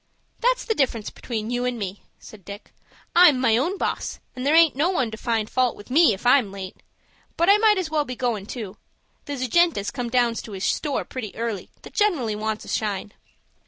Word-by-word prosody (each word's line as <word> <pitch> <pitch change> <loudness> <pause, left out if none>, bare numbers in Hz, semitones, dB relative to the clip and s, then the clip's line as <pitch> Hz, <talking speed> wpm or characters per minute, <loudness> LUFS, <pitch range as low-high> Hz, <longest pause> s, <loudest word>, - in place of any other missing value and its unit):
"That's - - +1
the 445 - +1
difference 240 - -1
between 225 -1 -5
you 245 0 -1
and 250 -1 -1
me," 200 -2 -5 0.2
said 210 -3 -14
Dick. 200 +3 -10 0.4
"I'm 340 -7 +7
my 240 -4 +3
own 335 - 0
boss, - - -3 0.2
and 255 - -5
there 300 - +4
aint 325 -4 +6
no 305 +6 +2
one 260 -11 0
to - - -5
find 225 -2 -1
fault 255 0 +1
with 205 - -13
me 315 0 +6
if 200 +3 -5
I'm 245 -5 +4
late. 190 -1 -8 0.6
But 340 +3 +3
I 410 - +6
might 430 -2 +4
as 355 -4 -2
well 305 -1 +2
be 255 -3 -6
goin' 230 -5 -2
too. 215 -5 -7 0.5
There's 285 -4 -4
a - - 0
gent 345 +4 +3
as 200 0 -3
comes 245 -3 -4
down 245 -2 +3
to 225 -2 -7
his 190 0 -3
store 290 -2 -1
pretty 230 -6 -7
early 225 -4 -4
that - - -12
generally 320 - +1
wants 215 0 -3
a - - -14
shine." 205 -2 -2
245 Hz, 220 wpm, -24 LUFS, 215-300 Hz, 0.6 s, I'm